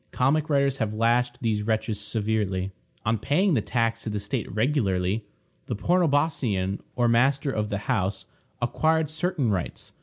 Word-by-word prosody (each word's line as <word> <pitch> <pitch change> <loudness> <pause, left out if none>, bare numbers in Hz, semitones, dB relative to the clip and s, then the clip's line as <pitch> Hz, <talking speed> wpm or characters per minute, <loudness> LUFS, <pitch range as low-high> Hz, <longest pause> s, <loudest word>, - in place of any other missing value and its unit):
Comic 150 +5 +1
writers 140 -2 +2
have 110 -3 -2
lashed 120 +2 +2
these 110 -3 0
wretches 110 -1 -1
severely. 100 -3 -1 0.3
On 110 0 +1
paying 175 - +2
the 120 - +3
tax 115 +1 0
to - - -4
the 105 -1 -2
state 105 -1 -3
regularly, 105 -4 0 0.4
the - - -2
pornobosceion, 140 - +1 0.2
or 120 -1 +2
master 135 +4 +3
of 105 -4 -1
the 100 - -1
house, 100 -6 -1 0.4
acquired 160 +4 +1
certain 155 - 0
rights. 90 -4 -4
115 Hz, 150 wpm, -26 LUFS, 105-140 Hz, 0.4 s, the